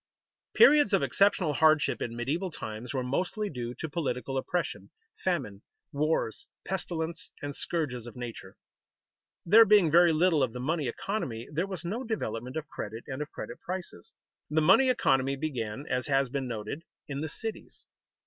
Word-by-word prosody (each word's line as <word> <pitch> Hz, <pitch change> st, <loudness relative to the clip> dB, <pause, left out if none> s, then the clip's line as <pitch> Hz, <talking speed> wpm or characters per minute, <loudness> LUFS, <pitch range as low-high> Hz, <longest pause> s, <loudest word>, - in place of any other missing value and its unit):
_ -, -, -64 dB
Periods 300 Hz, -, +7 dB
of -, -, +4 dB
exceptional 180 Hz, +2 st, +3 dB
hardship 155 Hz, +1 st, +3 dB
in 115 Hz, -, -3 dB
medieval 150 Hz, +11 st, -1 dB
times 115 Hz, -6 st, -6 dB
were 130 Hz, -2 st, -1 dB
mostly 185 Hz, -, -1 dB
due 120 Hz, -3 st, -5 dB
to 160 Hz, -, -4 dB
political 135 Hz, -5 st, -3 dB
oppression, 170 Hz, +6 st, -2 dB, 0.3 s
famine, 130 Hz, -, -1 dB, 0.3 s
wars, 150 Hz, -6 st, -1 dB, 0.2 s
pestilence, 170 Hz, -3 st, -3 dB
and 145 Hz, -1 st, -4 dB
scourges 125 Hz, -8 st, -2 dB
of 120 Hz, -, -10 dB
nature. 120 Hz, -2 st, -8 dB, 0.9 s
There 215 Hz, +7 st, +8 dB
being 205 Hz, -7 st, +5 dB
very 170 Hz, +1 st, +7 dB
little 160 Hz, -1 st, +3 dB
of 125 Hz, -4 st, +1 dB
the 125 Hz, -, -5 dB
money 150 Hz, +2 st, -1 dB
economy, 120 Hz, -, -3 dB
there 170 Hz, +6 st, 0 dB
was 185 Hz, -4 st, -5 dB
no 220 Hz, +9 st, -2 dB
development 130 Hz, -, -3 dB
of 155 Hz, -1 st, -4 dB
credit 115 Hz, -5 st, -6 dB
and 130 Hz, +2 st, -5 dB
of 150 Hz, -, -4 dB
credit -, -, -8 dB
prices. 180 Hz, -, -7 dB, 0.3 s
The 155 Hz, +1 st, +2 dB
money 195 Hz, +12 st, +6 dB
economy 135 Hz, -, +2 dB
began, 135 Hz, -4 st, -4 dB
as 125 Hz, -1 st, -1 dB
has 135 Hz, -2 st, +2 dB
been 135 Hz, 0 st, -2 dB
noted, 115 Hz, +5 st, -5 dB, 0.3 s
in 140 Hz, -1 st, -4 dB
the 160 Hz, -, -3 dB
cities. 220 Hz, +8 st, -7 dB
150 Hz, 165 wpm, -29 LUFS, 125-175 Hz, 0.9 s, There